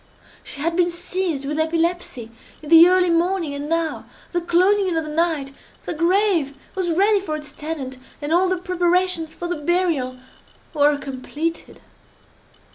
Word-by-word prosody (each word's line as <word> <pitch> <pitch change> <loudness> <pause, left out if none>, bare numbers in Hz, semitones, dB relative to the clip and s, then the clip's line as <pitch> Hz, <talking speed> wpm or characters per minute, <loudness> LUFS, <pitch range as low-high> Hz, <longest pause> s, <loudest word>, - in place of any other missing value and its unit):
She 280 - -8
had 335 +2 0
been 350 0 +3
seized 345 -4 -3
with 300 +2 -2
epilepsy 325 -7 -1 0.3
in 295 - -8
the 330 +1 +9
early 365 -1 +3
morning, 335 -2 +1
and 285 +1 -5
now, 330 -1 -1 0.2
at - - -30
the 350 - +1
closing 375 +4 +3
in 345 -3 0
of 320 - -1
the 305 - -6
night, 315 -4 0 0.3
the - - -3
grave 335 -3 +2 0.2
was 370 -2 -2
ready 400 +5 +3
for 365 -6 -4
its 300 -1 -8
tenant, 280 -5 -6 0.2
and 295 +2 -2
all 365 +2 +3
the 370 - +1
preparations 360 -2 0
for 350 - -5
the 350 -1 -2
burial 300 -6 0 0.6
were 295 -1 +3
completed. 290 +4 -5
335 Hz, 165 wpm, -22 LUFS, 300-360 Hz, 0.6 s, the